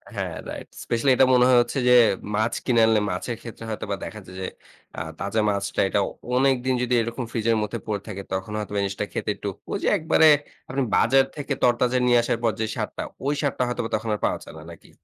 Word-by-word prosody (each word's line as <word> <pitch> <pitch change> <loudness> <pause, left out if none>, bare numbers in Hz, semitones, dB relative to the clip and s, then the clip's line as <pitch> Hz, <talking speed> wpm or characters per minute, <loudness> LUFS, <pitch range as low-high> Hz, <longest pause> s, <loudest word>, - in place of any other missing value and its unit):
হ্যাঁ, - - -3
right. - - -7 0.2
Specially 120 +3 0
এটা 130 - +6
মনে 125 0 +5
হয় 125 - +6
হচ্ছে 120 +3 -3
যে, - - +7 0.4
মাছ 110 +2 +1
কিনে 120 -3 +3
আনলে 110 -1 +4
মাছের 105 +6 -3
ক্ষেত্রে 115 -1 -9
হয়তোবা 105 -2 -3
দেখা 110 - -7
যায় 90 0 -12
যে, - - -2 0.5
আ - - -3 0.2
তাজা 100 +3 0
মাছটা 100 -1 -1
এটা 100 - +1 0.4
অনেকদিন 130 -1 +2
যদি 125 0 -1
এরকম 115 +2 -3
ফ্রিজের 115 0 +1
মধ্যে 110 +3 -4
পড়ে 105 -2 -2
থাকে, 100 -2 -5
তখন 95 +2 -3
হয়তোবা 105 -1 -4
এই - - +1
জিনিসটা 100 +1 -3
খেতে - - -3
একটু, 100 - -4 0.2
ঐ - - -5
যে, - - +1
একবারে 160 -1 +4 0.4
আপনি 135 +1 -1
বাজার 135 0 +4
থেকে 145 -1 -2
তরতাজা 125 +1 +3
নিয়ে 120 -1 +5
আসার 115 - 0
পর 115 - +3
যে, 110 - +1
স্বাদটা, - - -4 0.2
ওই 145 - +2
স্বাদটা 140 -3 0
হয়তোবা 120 -2 -3
তখন 110 +1 -3
আর - - -7
পাওয়া - - 0
যায় - - -12
না, 80 - -10
নাকি? 85 - -15
115 Hz, 220 wpm, -24 LUFS, 105-125 Hz, 0.5 s, যে